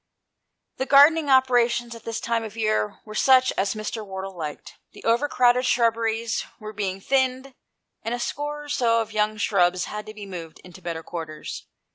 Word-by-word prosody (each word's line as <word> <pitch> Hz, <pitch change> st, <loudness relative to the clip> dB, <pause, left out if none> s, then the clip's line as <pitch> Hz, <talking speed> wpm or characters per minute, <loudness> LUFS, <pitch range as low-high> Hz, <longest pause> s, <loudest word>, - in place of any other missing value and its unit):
The 265 Hz, -, -2 dB
gardening 290 Hz, +2 st, +6 dB
operations 240 Hz, -2 st, +3 dB
at 230 Hz, -, -12 dB
this 230 Hz, 0 st, -3 dB
time 230 Hz, -1 st, -1 dB
of 220 Hz, 0 st, -8 dB
year 215 Hz, -2 st, 0 dB
were 215 Hz, -, -9 dB
such 260 Hz, +3 st, +5 dB
as 195 Hz, +2 st, 0 dB
Mr. 215 Hz, +1 st, -4 dB
Wardle 190 Hz, -1 st, -7 dB
liked. 155 Hz, -4 st, -7 dB
The -, -, -13 dB
over 235 Hz, +6 st, +2 dB
crowded 250 Hz, -1 st, +3 dB
shrubberies 230 Hz, -1 st, +1 dB, 0.2 s
were 215 Hz, -1 st, -8 dB
being 195 Hz, -2 st, -3 dB
thinned, 260 Hz, +3 st, 0 dB, 0.5 s
and 230 Hz, +2 st, -2 dB
a -, -, -6 dB
score 295 Hz, +3 st, -4 dB
or 295 Hz, -, -12 dB
so 230 Hz, -4 st, +2 dB
of 225 Hz, 0 st, -6 dB
young 215 Hz, 0 st, 0 dB
shrubs 180 Hz, -4 st, +2 dB
had 210 Hz, 0 st, -6 dB
to 215 Hz, -, -8 dB
be 210 Hz, -1 st, -8 dB
moved 170 Hz, -4 st, -8 dB
into 185 Hz, 0 st, -13 dB
better 165 Hz, -2 st, -5 dB
quarters. 160 Hz, -3 st, -7 dB
225 Hz, 180 wpm, -24 LUFS, 200-250 Hz, 0.5 s, gardening